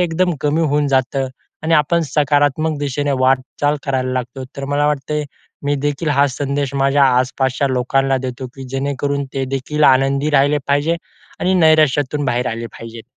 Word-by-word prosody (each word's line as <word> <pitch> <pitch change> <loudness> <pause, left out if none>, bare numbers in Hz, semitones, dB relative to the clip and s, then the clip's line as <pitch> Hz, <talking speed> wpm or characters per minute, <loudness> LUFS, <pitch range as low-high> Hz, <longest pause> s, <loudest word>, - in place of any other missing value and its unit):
एकदम 175 +1 +1
कमी 150 +2 +1
होऊन 150 -2 +1
जातं 135 0 +1 0.4
आणि 165 +1 +2
आपण 165 +2 +3
सकारात्मक 145 +1 +1
दिशेने 145 0 -1
वाटचाल 135 +3 +1
करायला 130 -2 -1
लागतो. 125 +1 -4
तर 140 - -4
मला 145 +1 0
वाटतंय, 150 +1 -1 0.4
मी 145 0 +1
देखील 145 +2 -1
हा 140 -1 +3
संदेश 140 +1 -2
माझ्या 140 +1 +3
आसपासच्या 130 +2 0
लोकांना 135 +1 +1
देतो 130 +1 -5
की 135 - -9
जेणेकरून 140 +1 -2
ते 135 -1 -1
देखील 150 +3 -1
आनंदी 135 +2 +3
राहिले 145 +1 +3
पाहिजे 145 +4 +2 0.4
आणि 185 +1 +1
नैराश्यातून 155 -4 +3
बाहेर 125 -1 0
आले 115 +1 -4
पाहिजेत. 115 0 -9
140 Hz, 155 wpm, -18 LUFS, 130-150 Hz, 0.4 s, आपण